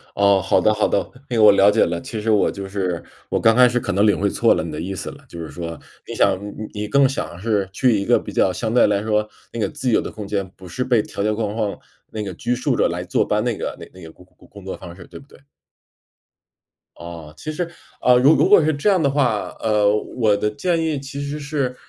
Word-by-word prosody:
哦， 100 -1 +4
好 95 - +2
的 110 +4 +3
好 105 0 +1
的。 - - -1 0.2
那 120 - -1
个 110 - +4
我 105 - +9
了 100 +1 +5
解 - - +3
了， 85 0 -3
其 110 - -6
实 110 - -2
我 105 - +3
就 100 -1 -7
是 95 -3 -2 0.3
我 - - 0
刚 115 0 +4
开 125 +1 +7
始 125 +1 0
可 100 - -3
能 100 +3 +3
领 105 - +3
会 100 - +1
错 - - +3
了， - - -2
你 80 - -6
的 75 - -5
意 90 +4 -4
思 95 - -5
了， - - -15
就 85 - -9
是 80 - -6
说， 85 -2 -7 0.3
你 - - -6
想 100 - +3
呃 - - 0
呃， - - -14 0.3
你 105 0 -4
更 140 +4 +4
想 130 -9 -5
是 100 -2 -1
去 120 +2 +2
一 100 - -1
个 - - +4
比 - - -9
较 95 - +2
相 110 +5 -3
对 125 - +5
来 100 -1 +1
说 105 -1 0 0.2
那 115 - -5
个 110 - 0
自 130 - -3
由 - - +3
的 - - -6
空 105 -2 -8
间， 100 -2 -2
不 95 - -12
是 125 +9 -3
被 120 -4 +2
条 100 - -5
条 105 +1 +1
框 105 -1 -2
框 105 -3 -2 0.3
那 110 - -4
个 95 -2 -5
拘 120 +8 -2
束 125 - 0
着 - - +2
来 - - -4
坐 - - 0
班， - - 0
那 - - -1
个 - - -4 0.2
那 95 - -14
个 80 - -10
工 90 - -19
工 - - -34
工 - - -19
工 100 -2 -13
作 95 - -5
方 85 - -10
式， 90 -2 -13
对 - - -11
不 - - -17
对？ - - -19 1.6
哦， 85 -3 -10
其 155 - -5
实， 170 +2 -3 0.3
呃， 125 0 +5
如 135 +5 +6
如 - - +3
果 205 -5 +7
是 155 +1 +2
这 145 +8 +1
样 190 -4 +3
的 140 - +2
话， 130 -7 0
呃， 105 -2 +2 0.2
我 110 -4 +3
的 105 +1 0
建 165 +8 -1
议 160 -3 -1
其 140 +1 -7
实 145 +1 -4
是， 140 -3 -2
105 Hz, 295 characters per minute, -21 LUFS, 95-125 Hz, 1.6 s, 我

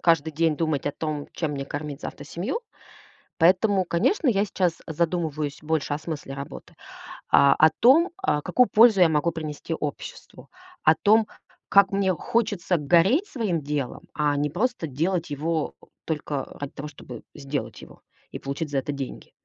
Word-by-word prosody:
каждый 165 -2 +3
день 160 0 +1
думать 155 -4 -1
о 145 - 0
том, 150 -2 -4
чем 155 -3 -2
мне 140 -1 -4
кормить 145 0 -6
завтра 145 - -7
семью. 200 - -3 0.8
Поэтому, 185 +3 +4
конечно, 265 - +1
я 205 -3 +3
сейчас 180 -4 -1
задумываюсь 160 -3 -2
больше 155 -2 -1
о - - -1
смысле 150 -4 -6
работы. 140 0 -9 0.6
А, 140 -1 +6
о 155 0 +5
том, 320 +9 +6 0.2
э, 150 - +2
какую 250 -1 +3
пользу 220 -3 +6
я 175 - +7
могу 160 +2 +1
принести 155 0 -5
обществу. 150 -3 -7 0.3
О 155 - +6
том, 215 +4 +3 0.4
как 200 0 +5
мне 195 -1 +2
хочется 205 -1 0
гореть 175 - +3
своим 210 - -2
делом, 145 -3 -3
а 145 -1 +1
не 145 +1 0
просто 220 - -1
делать 165 +4 -1
его 155 +2 -2 0.3
только 150 -3 -3 0.2
ради 145 - -5
того, 150 +2 -7
чтобы 125 -4 -10
сделать 140 0 -5
его - - -15 0.3
и - - -6
получить 140 +2 -4
за 140 - 0
это 135 +2 -2
деньги. 140 -2 -7
160 Hz, 165 wpm, -25 LUFS, 145-190 Hz, 0.8 s, я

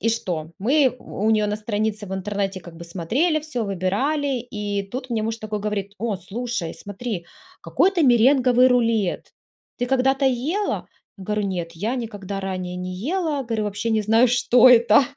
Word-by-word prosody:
и 230 - +1
что? 170 -8 -3
Мы 265 +5 +3
у 210 - -4
у - - +4
нее 215 -1 +3
на 210 0 -1
странице 210 -1 -2
в 190 - -4
интернете 195 0 -3
как 175 -1 -12
бы 170 - -9
смотрели 230 - 0
всё, 290 -7 -3
выбирали, 255 - 0
и 210 -4 -3
тут 255 +1 -5
мне 225 -2 0
муж 225 +1 -2
такой 215 -1 -4
говорит: 205 -1 -3
"О, 225 -3 -1
слушай, 200 -1 -4
смотри, 205 -2 -6 0.4
какой-то 375 -2 +2
меренговый 250 0 +5
рулет, 230 -6 +1 0.5
ты 245 - 0
когда-то 265 +1 +2
ела?" 295 +12 -1 0.3
Я 190 - -9
говорю: 210 +1 -1
"Нет, 175 -3 -3
я 210 +9 -2
никогда 205 -4 -5
ранее 185 -2 -4
не 180 0 -5
ела". 295 - -1
Говорю: 225 -3 -2
"Вообще 210 +2 -3
не 220 -1 +2
знаю, 225 +4 +4
что 245 +1 +5
это, 235 0 +6
220 Hz, 175 wpm, -23 LUFS, 195-250 Hz, 0.5 s, это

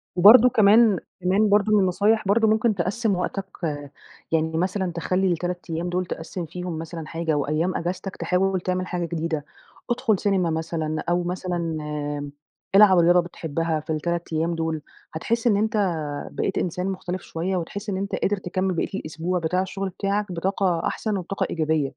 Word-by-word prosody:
وبرضه 220 +7 +9
كمان 215 -2 +5 0.2
كمان 195 +4 +3
برضه 210 +1 +3
من 210 - +6
النصايح 200 +3 +2
برضه 220 +2 +4
ممكن 220 0 +2
تقسّم 200 +3 0
وقتك، 195 +2 -4 0.7
يعني 160 0 +1
مثلًا 185 0 0
تخلّي 185 +2 0
ال3 175 +1 -4
أيام 165 +2 -2
دول 180 +1 -1
تقسّم 170 +1 -5
فيهم 175 0 -5
مثلًا 165 -1 -6
حاجة 165 -2 -1
وأيام 155 +6 0
أجازتك 185 +2 -3
تحاول 185 0 0
تعمل 185 0 -1
حاجة 175 -1 -2
جديدة، 160 -3 -3 0.4
ادخُل 235 -4 +1
سينما 190 -4 +1
مثلًا 160 -1 -2
أو 175 0 +2
مثلًا 180 0 -3
آمم، 150 -3 -3 0.4
العب 195 -3 +8
رياضة 175 +1 +5
بتحبها 165 -1 -2
في 155 - -15
ال3 170 +1 -2
أيام 165 +2 0
دول 160 -1 -2 0.3
هتحس 230 +9 -1
إن 205 -3 +4
أنت 220 +2 0 0.6
بقيت 195 - -2
إنسان 180 +1 -1
مختلِف 185 -1 -4
شوية، 180 +4 -3
وتحس 200 +5 -5
إن 190 - -1
أنت 195 0 -2
قادر 205 +1 0
تكمّل 185 0 -1
بقيّة 165 - -1
الأسبوع 170 +3 -3
بتاع 175 +3 0
الشغل 195 +1 -3
بتاعك 200 +1 -2
بطاقة 180 -1 0
أحسن 215 -3 -2
وبطاقة 190 +2 -2
إيجابية. 155 -2 +1
180 Hz, 165 wpm, -24 LUFS, 165-195 Hz, 0.7 s, وبرضه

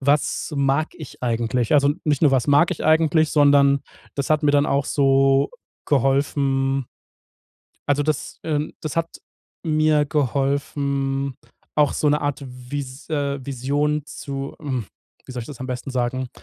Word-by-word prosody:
was 145 +3 0
mag 140 +2 +1
ich 155 -5 -11
eigentlich? 120 +1 0
Also, 140 -1 +5
nicht 150 -3 +1
nur 150 - +5
was 130 -3 +2
mag 145 +4 +4
ich - - -4
eigentlich, 155 0 +3
sondern 140 -1 +5 0.3
das 140 -1 -2
hat 155 0 +3
mir 150 - +4
dann 145 0 +4
auch 140 0 +1
so 135 0 +3 0.4
geholfen 135 -1 +1 1.0
also 145 0 +2
das 155 -1 -2
ähm, 150 -1 -2
das 155 -1 -5
hat 165 0 +1
hat - - -15 0.5
mir 155 -1 +3
geholfen, 140 -1 -1 0.4
auch 150 -1 +4
so 150 - +1
'ne 150 +1 +2
Art 145 0 -2
Vis 130 +2 -7
äh, 140 -3 -2
Vision 145 +3 -1
zu 140 -2 -6
hm, 130 -8 -3 0.4
wie - - -8
soll 125 -1 -4
ich - - -10
das 140 -5 -10
am 130 - -4
besten 125 +1 -4
sagen? 130 0 -1
140 Hz, 155 wpm, -22 LUFS, 135-150 Hz, 1.0 s, Also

